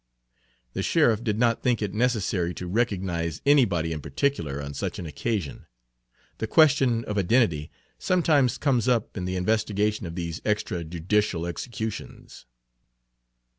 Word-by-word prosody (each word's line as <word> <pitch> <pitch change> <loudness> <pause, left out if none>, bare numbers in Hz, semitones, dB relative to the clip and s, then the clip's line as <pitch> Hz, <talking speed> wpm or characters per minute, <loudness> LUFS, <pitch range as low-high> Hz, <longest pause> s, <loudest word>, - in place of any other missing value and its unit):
The - - -2
sheriff 115 -1 +2
did 105 -3 -1
not 115 -1 +2
think 125 -2 +1
it 105 -3 -3
necessary 105 -7 0
to 90 - -6
recognize 90 -5 -1
anybody 100 - +3
in 75 - -5
particular 70 - -1
on 70 0 -6
such - - -4
an 90 - -6
occasion; 90 0 -3 0.7
the 110 - -2
question 135 -5 +4
of 105 -1 -1
identity 95 -7 +2 0.3
sometimes 155 -8 +2
comes 130 -6 +1
up 120 -4 +1
in 90 -3 -3
the 95 0 -2
investigation 105 +1 0
of 85 - -7
these 85 -2 -4
extra 105 -4 -1
judicial 85 +2 0
executions. 110 - -6
105 Hz, 135 wpm, -26 LUFS, 85-120 Hz, 0.7 s, question